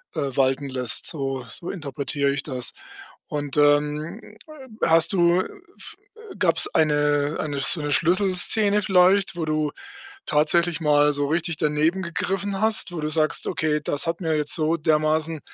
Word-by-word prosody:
äh, - - -2 0.2
walten 135 +1 0
lässt, 125 -2 +2
so 135 -4 -2
so 170 - -6
interpretiere 140 -3 -3
ich 140 0 -3
das. 130 -4 -4 0.6
Und, 145 -1 -4
ähm, 150 +6 0 0.5
hast 165 +2 +4
du, 175 0 +3
äh, - - -5 0.3
f 430 - -12 0.2
äh, 440 -2 -13
gab's 180 -4 +3
eine 145 -1 +1
eine 145 -2 -3
sch 135 - +2
so 155 - -6
'ne 145 0 -3
Schlüsselszene 200 +5 +3
vielleicht, 190 0 +3
wo 160 - -2
du 155 -1 -1 0.5
tatsächlich 165 +3 +1
mal 150 -1 +3
so 145 0 -1
richtig 165 +1 -2
daneben 155 +5 0
gegriffen 195 +3 -3
hast, 220 -4 0
wo 165 - -5
du 150 - -2
sagst: 155 -1 -1
„Okay, 150 -1 -1
das 145 - -1
hat 165 +2 -2
mir 160 -2 -1
jetzt 150 -1 -1
so 160 0 0
dermaßen 155 0 0
155 Hz, 160 wpm, -23 LUFS, 145-175 Hz, 0.6 s, hast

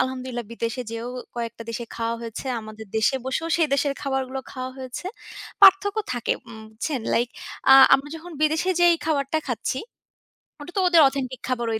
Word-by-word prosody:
আলহামদুলিল্লাহ 255 -2 -2
বিদেশে 230 +2 -3
যেয়েও 230 +1 -5 0.3
কয়েকটা 235 -1 -4
দেশে 235 +1 -5
খাওয়া 230 0 -1
হয়েছে। 230 -2 -6 0.2
আমাদের 215 0 -10
দেশে 220 +5 +2
বসেও 320 +5 -2
সেই 330 -2 +3
দেশের 280 0 +1
খাবারগুলো 265 -1 -2
খাওয়া 255 -1 -5
হয়েছে। 260 +6 -7 0.5
পার্থক্য 395 +2 +7
থাকে 245 -2 0 0.2
উম 225 -1 -10
বুঝছেন, 245 +5 -3
লাইক 240 +1 +2 0.4
আ - - +11 0.2
আমরা 270 +2 0
যখন 340 +2 -10
বিদেশে 315 +4 +2
যেই 345 -1 +6
খাবারটা 300 -1 0
খাচ্ছি 255 +1 -2 0.8
ওটা 345 +4 -9
তো - - +4
ওদের 340 -2 +6
অথেন্টিক 260 -2 -4
খাবার 240 -2 -1
ওই 220 - -1
260 Hz, 170 wpm, -24 LUFS, 235-300 Hz, 0.8 s, আ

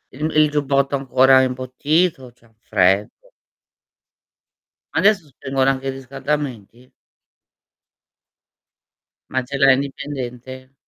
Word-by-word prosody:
il 145 - -7
il 155 -1 +5
giubbotto 140 -1 0
è - - +1
ancora 130 0 +4
imbottito, 130 +3 -1
c'è 120 - -28
un 115 - -27
freddo. 100 - 0 1.7
Adesso 200 -4 +3
spengono 135 0 -1
anche 135 0 -5
i - - 0
riscaldamenti? 135 -3 -5 2.4
Ma 130 0 -1
ce 135 +3 -7
l'hai 135 -1 +6
indipendente? 130 -2 -6
135 Hz, 100 wpm, -20 LUFS, 130-140 Hz, 2.4 s, l'hai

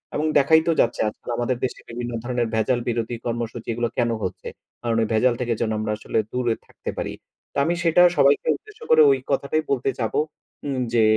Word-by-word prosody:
এবং 150 - 0
দেখাই 160 +3 +5
তো - - +4
যাচ্ছে, 120 - 0
আজকাল 105 - -12
আমাদের 120 +1 0
দেশে 130 - -2
বিভিন্ন 120 +1 -4
ধরনের 120 -1 -1
ভেজাল 110 +3 +2
বিরোধী 115 0 -2
কর্মসূচি, 115 -1 -4
এগুলো 120 +1 -1
কেন 120 -1 +2
হচ্ছে? 90 - -4 0.3
কারণ 115 -1 0
ওই 110 - +1
ভেজাল 120 +3 +3
থেকে 120 -1 0
যেন 110 -2 0
আমরা 110 0 -2
আসলে 110 - -3
দূরে 125 -2 0
থাকতে - - -7
পারি। - - -3 0.4
তো, - - -6
আমি 170 - +2
সেটা 170 +1 +5
সবাইকে 140 0 +4
উদ্দেশ্য 425 0 -15
করে 155 0 +7
ওই 135 - +2
কথাটাই 140 +3 +1
বলতে 135 -1 +1
চাবো। 110 -3 0 0.5
উম 130 -2 -1
যে, 115 -2 +4
120 Hz, 200 wpm, -23 LUFS, 115-140 Hz, 0.5 s, করে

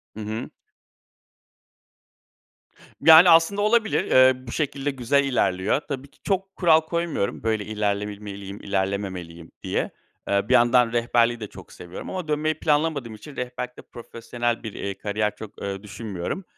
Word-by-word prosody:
Hı - - -8
hı. 110 +2 -5 2.5
Yani, 160 +2 +9
aslında 165 +5 +5
olabilir. 220 +1 +2
Eee, 130 0 +4
bu - - -6
şekilde 145 -1 -2
güzel 135 +2 +1
ilerliyor. 110 -3 +1
Tabii 140 -2 -5
ki - - -28
çok 195 -1 -2
kural 160 -3 +5
koymuyorum, 165 -11 -2
böyle 110 -2 0
ilerlebilmeliyim 100 -1 -4
ilerlememeliyim 95 -4 -3
diye. - - -2 0.4
Eee, 100 0 +1
bir - - +3
yandan 120 0 +4
rehberliği 120 0 +2
de 110 - -6
çok - - -13
seviyorum 90 0 -9
ama 185 -4 -5
dönmeyi 155 +1 -1
planlamadığım 145 -6 0
için 135 +7 -12
rehberlikte 125 0 -5
profesyonel 120 0 -4
bir, 110 - -6
eee, 100 -1 -5
kariyer 105 0 -2
çok, 110 -2 -11
ııı, 100 0 -5
düşünmüyorum. 105 - -5
120 Hz, 140 wpm, -24 LUFS, 105-150 Hz, 2.5 s, Yani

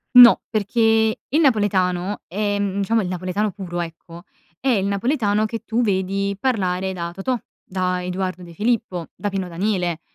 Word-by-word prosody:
No, 245 -1 +10
perché 220 +1 +2
il 305 - +2
napoletano, 200 - +1
ehm, 200 0 -1
diciamo 225 +3 +2
il - - -3
napoletano 185 +3 -2
puro 175 -3 -5
ecco, 170 0 -8 0.4
è - - -10
il 205 -6 +2
napoletano 210 0 +1
che 225 +1 -5
tu 230 +2 0
vedi 195 -1 0
parlare 190 -7 0
da 170 -2 -4
Totò, 240 +7 -1 0.3
da 180 -1 -1
Eduardo 185 0 -3
De 170 -1 -11
Filippo, 210 -3 -1
da 205 - -3
Pino 195 -2 -2
Daniele, 175 -1 -1
195 Hz, 155 wpm, -22 LUFS, 180-220 Hz, 0.4 s, No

